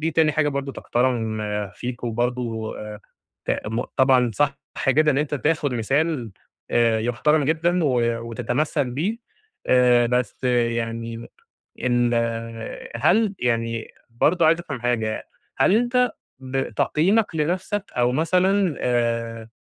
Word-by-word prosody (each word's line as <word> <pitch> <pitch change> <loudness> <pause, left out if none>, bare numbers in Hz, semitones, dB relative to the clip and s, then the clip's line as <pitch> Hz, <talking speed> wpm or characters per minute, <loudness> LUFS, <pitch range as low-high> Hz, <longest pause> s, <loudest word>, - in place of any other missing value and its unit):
دي 160 +1 0
تاني 160 -1 +3
حاجة 150 0 +1
برضه 140 -1 -3
تُحترم 120 -4 -1 0.3
فيك، 125 0 -6
وبرضه 120 -1 -2 0.7
ت - - -2 0.2
م 115 +3 -1
طبعًا 130 -2 +4
صح 140 +1 +1 0.3
جدًا 150 +3 +4
إن 135 - +1
أنت 150 0 -1
تاخد 145 -2 0
مثال 135 +1 0 0.4
آآ، 115 -1 +3
يُحترم 145 +6 +2
جدًا 165 +3 +1
و 135 -4 +2 0.4
وتتمثّل 125 +4 -1
بيه، 180 - -2 0.5
آآ، 125 -1 +5
بس 125 +1 -1
يعني 115 -1 -1 0.6
إن 120 -1 +2 0.8
هل 195 - +2
يعني 115 -1 -1 0.2
برضه 160 +9 +2
عايز 165 +1 +4
أفهم 140 -8 -6
حاجة، 110 -3 -1 0.3
هل 195 - +4
أنت 245 +2 +2 0.3
ب 135 0 -3
تقييمك 185 - +1
لنفسك، 185 +6 -1
أو 125 0 +2
مثلًا 180 +4 +2
آآ، 115 -2 -1
130 Hz, 120 wpm, -23 LUFS, 120-155 Hz, 0.8 s, آآ